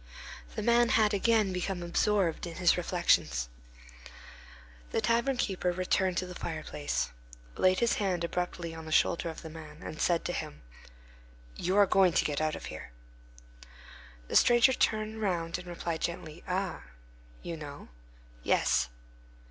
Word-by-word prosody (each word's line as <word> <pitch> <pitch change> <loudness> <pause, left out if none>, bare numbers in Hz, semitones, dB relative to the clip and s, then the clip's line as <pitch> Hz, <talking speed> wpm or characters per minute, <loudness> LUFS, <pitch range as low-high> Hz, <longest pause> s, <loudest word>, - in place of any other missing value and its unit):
The - - -3
man 235 +1 +4
had 215 -2 +3
again 210 -1 +2
become 180 0 -2
absorbed 175 0 +1
in 170 - -7
his 175 -1 +4
reflections. 170 - +1 1.4
The - - 0
tavern 235 +3 +1
keeper 185 -5 0
returned 185 0 0
to 185 - 0
the 180 - -8
fireplace, 70 - -3 0.4
laid 185 +2 +3
his 235 - +2
hand 185 -5 0
abruptly 175 -1 -3
on 160 -1 -8
the 160 - -7
shoulder 170 +2 +2
of 160 - -8
the 160 - -7
man, 160 -1 -11
and 155 - -6
said 170 -2 +2
to 175 - -1
him:— 75 - -6 0.9
"You 185 +3 0
are 205 - +7
going 190 -2 +4
to - - +2
get 150 0 -1
out 155 0 0
of - - -8
here." - - -8 1.4
The - - -4
stranger 240 +2 +6
turned 220 -2 0
round 175 -4 -1
and 180 - -11
replied 170 -2 -4
gently, 170 -1 -4
"Ah! 185 +1 -2 0.6
You 170 - -4
know?—" 145 -2 -9 0.5
"Yes." 65 +1 +2
180 Hz, 150 wpm, -30 LUFS, 165-200 Hz, 1.4 s, are